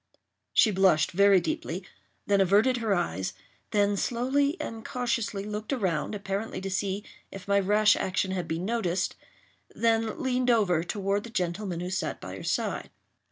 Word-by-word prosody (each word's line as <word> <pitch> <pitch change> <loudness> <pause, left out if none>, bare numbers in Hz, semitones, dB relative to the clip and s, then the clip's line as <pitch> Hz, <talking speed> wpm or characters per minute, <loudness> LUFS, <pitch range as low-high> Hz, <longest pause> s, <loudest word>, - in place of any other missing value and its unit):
She 220 - +5
blushed 185 -5 +3
very 200 +1 +5
deeply—then 205 - -3
averted 210 +7 +4
her 225 -4 +1
eyes—then 200 - -2
slowly 275 - +1
and 225 -1 -5
cautiously 235 -5 -2
looked 210 +2 -5
around, 190 - -1
apparently 200 +1 -3
to 195 +1 -5
see 195 +1 -1 0.3
if 195 -1 -9
my 200 0 +4
rash 210 +2 +4
action 190 0 -1
had 180 -3 -2
been 165 +3 -2
noticed—then 225 +2 -2
leaned 255 -1 0
over 195 -8 +3
toward 200 +2 -1
the 235 - -8
gentleman 180 -2 -2
who 180 +1 -4
sat 190 - -2
by - - -7
her - - -8
side. - - -2
200 Hz, 145 wpm, -28 LUFS, 190-225 Hz, 0.3 s, She